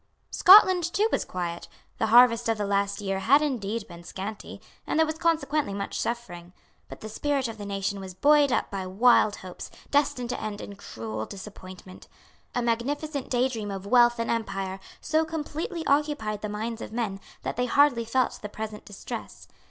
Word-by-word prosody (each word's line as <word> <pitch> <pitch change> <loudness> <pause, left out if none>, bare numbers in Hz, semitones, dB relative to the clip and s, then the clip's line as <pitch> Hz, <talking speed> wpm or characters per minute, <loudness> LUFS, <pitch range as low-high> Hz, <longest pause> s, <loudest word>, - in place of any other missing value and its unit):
Scotland 375 -2 +7
too 420 +4 +2
was - - +1
quiet. 175 -2 -5 0.3
The 220 - +1
harvest 235 0 +6
of 225 - +1
the 205 - -2
last 200 +1 0
year 195 -1 -2
had 280 +9 +4
indeed 230 -6 -2
been 170 -1 -12
scanty; 200 +4 -7 0.3
and - - -1
there 320 - +5
was 315 0 -5
consequently 310 - 0
much 200 - -4
suffering. 180 -7 -5 0.4
But - - -10
the 215 - -6
spirit 275 +4 -1
of 225 -1 -8
the 205 - -6
nation 195 0 -2
was 190 -1 -8
buoyed 290 +5 +4
up - - 0
by 190 -2 -4
wild 215 +1 +4
hopes, 185 -1 -9 0.2
destined 255 -4 +1
to - - -4
end 210 -1 -4
in 200 - -8
cruel 110 - -6
disappointment. 185 -2 -11 0.5
A 245 - 0
magnificent 280 +5 -2
daydream 240 -4 0
of 195 -1 -6
wealth 240 +2 +5
and 230 - -1
empire 195 -4 -3 0.2
so 315 +1 +1
completely 320 +1 -4
occupied 280 -8 0
the 210 - -4
minds 225 +2 -4
of - - -7
men 220 -4 -3 0.2
that - - -3
they 250 +1 0
hardly 280 -3 +4
felt 250 +3 0
the 210 - -6
present 215 0 -7
distress. 205 - -8
225 Hz, 180 wpm, -26 LUFS, 200-275 Hz, 0.5 s, Scotland